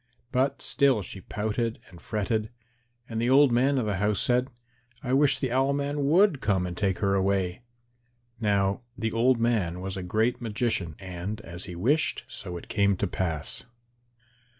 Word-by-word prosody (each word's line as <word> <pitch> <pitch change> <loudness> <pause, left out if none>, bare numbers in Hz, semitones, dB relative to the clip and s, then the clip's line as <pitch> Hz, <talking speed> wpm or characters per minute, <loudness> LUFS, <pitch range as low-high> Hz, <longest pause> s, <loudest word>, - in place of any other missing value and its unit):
But 135 +1 0
still 135 -7 +2
she 95 - -8
pouted 110 +3 -2
and 85 - -14
fretted. 110 +1 -1 0.6
And 115 -1 -3
the 120 - +1
old 135 0 +6
man 135 +4 +3
of 125 - 0
the 105 -3 -1
house 105 +1 +1
said, 125 0 +2 0.5
"I 125 - -1
wish 140 +1 +4
the 130 -3 -2
Owl 135 +2 +2
man 140 0 -1
would 175 -3 +4
come 95 -4 +1
and 90 -1 -5
take 95 0 0
her 100 -1 +1
away." 95 0 0 0.8
Now 100 -1 +1 0.2
the 110 0 -1
old 120 +2 +3
man 105 -7 0
was 95 +1 -4
a - - -3
great 110 +8 0
magician, 105 -7 -1
and 95 +3 -5
as 85 -2 -6
he 90 - -7
wished, 140 - +1
so 90 -2 -7
it - - -10
came 100 -2 +2
to 100 - 0
pass. 85 -5 -1
110 Hz, 175 wpm, -27 LUFS, 95-125 Hz, 0.8 s, old